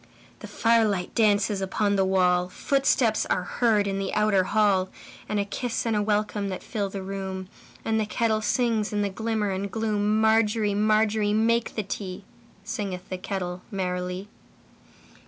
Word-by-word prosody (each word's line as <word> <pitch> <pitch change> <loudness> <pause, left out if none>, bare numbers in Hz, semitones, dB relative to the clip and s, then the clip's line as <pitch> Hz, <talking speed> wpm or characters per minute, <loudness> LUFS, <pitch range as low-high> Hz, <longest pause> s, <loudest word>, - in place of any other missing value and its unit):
The - - -9
firelight 220 -6 +1
dances 205 -2 +2
upon 200 +2 0
the 195 - +3
wall, 180 -1 +2
Footsteps 260 -1 +1
are 180 - 0
heard 215 +1 +1
in 195 -1 -2
the 195 -1 -2
outer 210 -3 +3
hall, 200 -3 +2 0.4
And 210 - 0
a 200 - 0
kiss 240 +4 -3
and 225 -1 +1
a 210 - +2
welcome 210 -1 0
that 185 - -5
fill 205 -3 -3
the 195 0 -6
room, 190 -1 -5 0.4
And 220 0 +1
the 215 - -1
kettle 220 0 0
sings 220 -1 0
in 205 -1 0
the 200 - 0
glimmer 220 0 -1
and 195 +1 -3
gloom. 215 -1 0
Margery, 220 -1 +3
Margery, 215 0 +2
make 230 +2 +1
the 215 - -1
tea, 195 -1 -6 0.4
Singeth 200 -4 -5
the 185 - -3
kettle 180 -2 -4
merrily. 180 -1 -3
205 Hz, 160 wpm, -26 LUFS, 190-220 Hz, 0.4 s, the